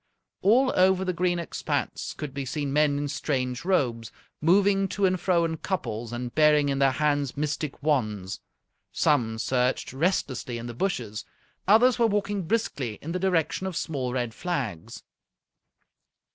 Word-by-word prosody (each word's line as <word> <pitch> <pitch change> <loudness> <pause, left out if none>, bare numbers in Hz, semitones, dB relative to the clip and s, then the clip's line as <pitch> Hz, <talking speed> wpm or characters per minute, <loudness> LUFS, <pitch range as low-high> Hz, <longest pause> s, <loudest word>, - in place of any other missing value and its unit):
All 255 +6 +4
over 190 0 +4
the 185 - 0
green 175 0 +1
expanse 170 - -3
could 150 -3 -6
be 140 0 -3
seen 140 +1 -3
men 150 -1 +3
in 145 0 -2
strange 130 -3 -2
robes, 125 - 0 0.3
moving 195 +4 +4
to 200 +1 0
and 185 -1 +1
fro 175 -2 +2
in 160 -1 -2
couples 120 - -3
and 120 0 -5
bearing 150 -2 +4
in 135 0 0
their 135 -1 +4
hands 145 -2 0
mystic 150 -1 -3
wands. 110 -10 -1 0.5
Some 115 -7 +1
searched 125 +3 0
restlessly 130 -6 -1
in 115 - -6
the 120 - -6
bushes, 115 - -2 0.4
others 240 +5 +5
were 230 - +5
walking 200 -3 -1
briskly 140 - -1
in 160 - -4
the 180 - -2
direction 180 -1 0
of 185 - -4
small 135 -6 -2
red 120 -3 -2
flags. 130 - -4
150 Hz, 155 wpm, -26 LUFS, 125-185 Hz, 0.5 s, others